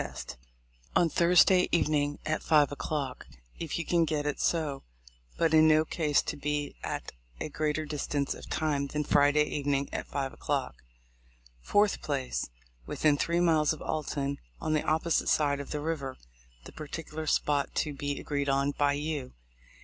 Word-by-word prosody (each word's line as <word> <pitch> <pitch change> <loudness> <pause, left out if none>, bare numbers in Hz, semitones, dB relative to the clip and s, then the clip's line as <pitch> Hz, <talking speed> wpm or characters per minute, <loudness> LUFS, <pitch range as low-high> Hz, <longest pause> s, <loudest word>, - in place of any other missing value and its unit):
Time:— - - -6 0.8
On 170 - +4
Thursday 180 +3 +5
evening 145 -3 +1
at 155 - -1
five 150 -3 +4
o'clock, 145 -2 -4 0.3
if 165 -3 -3
you 170 - -3
can 170 -1 +3
get 150 -2 -1
it 150 - -2
so; 155 -5 0 0.6
but 165 -1 +2
in 155 0 +7
no 155 0 +5
case 150 -3 +1
to - - -3
be 145 0 -2
at - - -4 0.3
a - - -3
greater 155 +1 -1
distance 145 -1 -2
of - - -11
time 145 -3 0
than 150 +2 -2
Friday 145 +1 +4
evening 140 -2 -1
at - - -3
5 135 -2 -3
o'clock. 135 - -3 0.8
4th. 205 - +2
Place 135 - -2 0.2
:— - - -33
Within 150 -2 +2
three 170 +4 0
miles 160 -3 +3
of 155 - -10
Alton, 140 -2 -2 0.2
on 155 - -1
the 155 - +2
opposite 160 +1 +1
side 145 -2 +2
of 140 - -7
the 150 - -3
river, 145 -4 -3 0.5
the - - -11
particular 155 +1 -6
spot 145 -1 +1
to 150 - 0
be 145 0 -3
agreed 140 -1 -2
on 140 +1 +2
by 145 0 +1
you. 145 -2 -3
150 Hz, 165 wpm, -29 LUFS, 140-155 Hz, 0.8 s, in